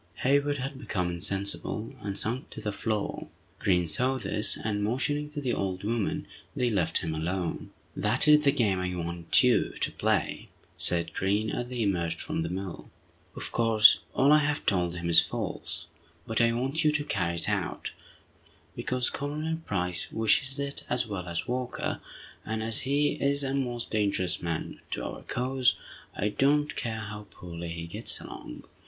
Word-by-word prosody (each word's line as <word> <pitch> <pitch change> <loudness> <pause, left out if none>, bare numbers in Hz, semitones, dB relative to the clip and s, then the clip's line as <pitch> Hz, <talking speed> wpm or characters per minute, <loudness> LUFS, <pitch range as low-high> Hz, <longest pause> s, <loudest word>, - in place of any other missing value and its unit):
Hayward 145 +2 +3
had 135 +1 -4
become 90 -9 -1
insensible, 100 +5 -1
and 100 -1 -3
sunk 120 +4 +1
to - - -8
the 105 -1 -2
floor. 105 0 -2 0.3
Green 90 -4 +2
saw 125 +12 +2
this, 110 -3 +2
and 105 -1 -2
motioning 140 +7 0
to 150 0 -5
the 130 -4 -1
old 95 -1 -2
woman, 110 0 -1 0.3
they 125 -2 +1
left 90 -6 +2
him 80 - -2
alone. 85 +3 -2 0.3
"That - - +3
is 150 0 +7
the 140 - +5
game 105 -9 +2
I 90 0 -2
want 85 -1 +2
you - - +3
to - - +1
play!" - - 0 0.3
said 85 -1 -1
Green, 100 +3 +1
as 120 0 -3
they 125 -2 -1
emerged 85 -5 0
from - - -2
the 80 - -2
mill. 95 0 -5 0.5
"Of - - -5
course, 115 -2 +6 0.2
all 140 +2 +5
I 150 - +8
have 150 0 0
told 90 -3 +1
him 85 -1 -3
is 85 - +8
false. - - -2 0.4
But 110 +1 +1
I 115 0 +5
want 135 +7 0
you 155 - +5
to 150 0 +1
carry 90 - 0
it 85 - -2
out, - - -1 0.8
because 125 -1 0
Colonel 155 +3 -2
Price 90 -3 -1
wishes 110 +5 +2
it 140 0 -2
as 125 0 +2
well 100 -5 -5
as 85 -1 -3
Walker, 125 0 -2 0.4
and 110 0 -3
as 115 0 +1
he 145 +2 +2
is 140 0 0
a 135 0 -1
most 120 -3 -2
dangerous 100 -4 +1
man 85 -2 -3
to - - -3
our - - -6
cause, 130 0 +1 0.4
I 105 - 0
don't 145 +6 +2
care 110 -2 -2
how 105 -1 -7
poorly 85 -1 -7
he 85 0 -4
gets 85 - -1
along. - - -9
110 Hz, 175 wpm, -28 LUFS, 90-135 Hz, 0.8 s, I